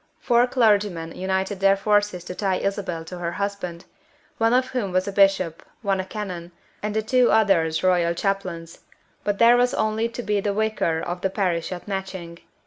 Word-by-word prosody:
Four 240 0 +3
clergymen 205 -9 +1
united 190 +1 -2
their 195 0 +4
forces 205 -2 +1
to 180 - -6
tie 190 0 0
Isabel 185 -4 -3
to 180 +2 -8
her 170 0 -3
husband, 200 -4 -4 0.5
one 225 0 +3
of 255 +1 +2
whom 230 -7 -2
was 185 +1 0
a - - -2
bishop, 195 -4 +2 0.2
one 195 -2 +1
a 185 - -2
canon, 185 -4 -6 0.3
and 210 0 -3
the 220 - +1
two 250 +2 +3
others 185 -8 +3
royal 175 -2 +2
chaplains; 185 -4 -3 0.4
but 205 -1 -1
there 235 +2 +6
was 245 0 +2
only 220 +1 0
to 240 +1 -6
be 210 -2 0
the 200 0 -1
Vicar 215 -7 0
of 175 +1 -4
the 190 - +1
parish 180 -4 -1
at 180 +1 -7
Matching. 190 -4 -5
195 Hz, 185 wpm, -23 LUFS, 180-210 Hz, 0.5 s, there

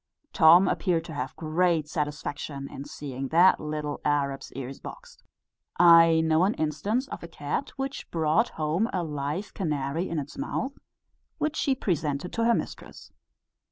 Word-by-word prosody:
Tom 175 +2 +7
appeared 170 -4 0
to 160 - -8
have 135 -2 -4
great 165 -1 +1
satisfaction 145 -2 -4
in 140 - -7
seeing 135 -2 -6
that 175 +6 +5
little 150 -1 -4
Arab's 140 -2 -1
ears 135 0 -7
boxed. - - -11 0.6
I 165 -2 +7
know 160 +1 +3
an 200 +4 +2
instance 180 - -1
of - - -6
a - - -7
cat, - - -3
which 270 0 -5
brought 165 +8 +2
home 160 +9 0
a 180 -2 -1
live 150 +5 -4
canary 155 0 -2
in 165 - -3
its 145 - -5
mouth, 275 -1 -3 0.6
which 305 0 -1
she 275 -4 +1
presented 160 - -2
to 230 - 0
her 235 0 +4
mistress. - - -7
160 Hz, 155 wpm, -27 LUFS, 145-185 Hz, 0.6 s, Tom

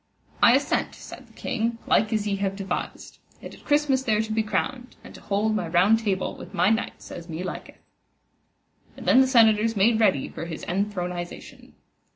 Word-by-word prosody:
I - - +7
assent, - - 0
said - - -12
the - - -22
king, 230 +1 -2
like 215 - +2
as 215 -2 0
ye 200 -1 -1
have 195 0 -2
devised, 195 0 -5 0.2
and - - -10
at - - -16
Christmas 290 -3 +2
there 220 -5 +1
to 220 - -6
be 220 0 +1
crowned, 245 +4 -3
and - - -12
to - - -13
hold 210 +2 0
my 180 -5 -2
Round 185 +7 +4
Table 195 -4 -2
with 185 +3 -11
my 195 +2 +3
knights 225 +2 -3
as 170 0 -9
me 165 +2 -5
liketh. 185 - -7 1.2
And - - -10
then 260 - +6
the 260 - +3
senators 225 -3 +4
made 220 +3 +3
ready 190 -12 +2
for 165 - -7
his 165 -2 -7
enthronization. 180 -2 -5
210 Hz, 190 wpm, -25 LUFS, 190-225 Hz, 1.2 s, I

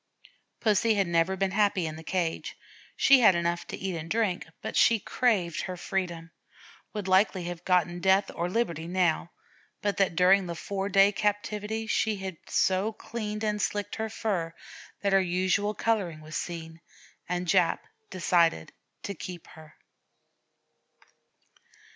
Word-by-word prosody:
Pussy 220 +1 +3
had 200 -1 +2
never 170 +3 +1
been 195 0 0
happy 200 -3 +2
in 155 -1 -4
the 160 - -9
cage. 170 -2 -2 0.4
She 275 -1 +6
had 215 -6 +6
enough 170 0 -1
to - - -6
eat 190 -2 -3
and 165 0 -6
drink, 210 -6 0 0.2
but - - -4
she 230 -1 +5
craved 190 -8 0
her 185 -1 -5
freedom 175 -3 -3 0.6
would 210 -3 -5
likely 190 0 +3
have 175 0 -6
gotten 175 -1 +2
'death 190 +2 +3
or 175 +1 -2
liberty' 170 -7 -1
now, 175 -2 +1 0.5
but 205 -2 0
that 195 -4 +2
during 185 +1 +4
the 170 - -4
four 195 +3 -3
days' 200 +1 +5
captivity 210 +1 -2
she 220 0 +1
had 190 -3 -6
so 190 +3 +1
cleaned 215 -1 -5
and 210 -1 0
slicked 205 +1 -2
her 220 0 -2
fur 185 -7 -2 0.5
that 200 -1 +1
her 195 - +6
unusual 185 +3 0
coloring 195 -10 -1
was 155 0 -9
seen, 165 -1 -5 0.5
and 180 0 -1
Jap 180 -1 +2 0.3
decided 170 - +1 0.3
to 200 - -4
keep 175 -1 -8
her. 155 0 -15
190 Hz, 150 wpm, -28 LUFS, 170-205 Hz, 0.6 s, She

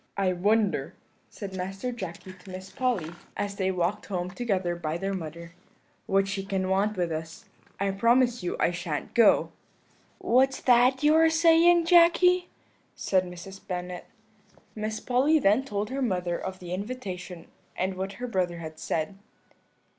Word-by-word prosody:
"'I 190 -2 +1
wonder,' 205 +3 +1 0.3
said 195 -3 -8
Master 195 +6 -4
Jacky 185 -4 -7
to 185 +1 -16
Miss 185 +1 -8
Polly, 245 - -1 0.3
as 200 -1 -3
they 190 -1 0
walked 185 +2 -1
home 180 -2 -3
together 190 -6 -1
by 160 -1 -3
their 195 +2 -3
mother, 170 -1 -7 0.5
'what 195 0 +2
she 195 0 -3
can 190 -1 -2
want 200 +2 +1
with 175 -2 -1
us. 160 +7 -6 0.3
I 200 0 +1
promise 235 +4 +2
you 175 - -2
I - - +2
shan't 170 -4 -4
go.' 230 -3 +4 0.7
"'What's 265 +2 +2
that 255 +2 +4
you 300 +1 +5
are 320 0 +5
saying, 335 +1 +5
Jacky?' 355 +1 +5 0.5
said 185 -1 +1
Mrs. 180 +2 -10
Bennet. 180 -1 -5 0.7
"Miss 215 0 -4
Polly 265 +6 +2
then 225 -1 +3
told 210 -4 -3
her 275 +1 -2
mother 180 -7 -1
of 190 +2 -5
the 180 -1 -7
invitation 185 -5 -6 0.3
and 190 +1 -1
what 190 +1 -4
her 250 - -6
brother 185 -7 -1
had 160 -1 -8
said. 165 +6 -3
195 Hz, 155 wpm, -27 LUFS, 180-245 Hz, 0.7 s, you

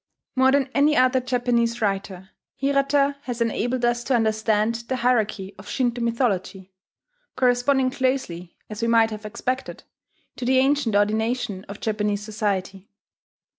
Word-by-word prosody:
More 260 0 +4
than 275 -1 +1
any 295 +2 +3
other 255 +1 +4
Japanese 240 -2 0
writer, 195 -2 -3 0.2
Hirata 280 +1 +1
has 245 -2 -4
enabled 240 +2 0
us 240 0 0
to 265 - +2
understand 220 -1 +1
the 260 - -1
hierarchy 220 -6 0
of 195 - -12
Shinto 245 -2 -1
mythology, 195 -5 -1 0.6
corresponding 255 +1 +2
closely, 255 -11 -2
as 215 +1 -7
we 230 - +1
might 225 -1 +4
have 215 0 -6
expected, 255 +5 -4 0.5
to 245 - -4
the 260 +1 +3
ancient 265 -4 +2
ordination 215 0 0
of 200 +1 -9
Japanese 210 -1 -1
society. 200 -2 -3
235 Hz, 135 wpm, -23 LUFS, 210-255 Hz, 0.6 s, More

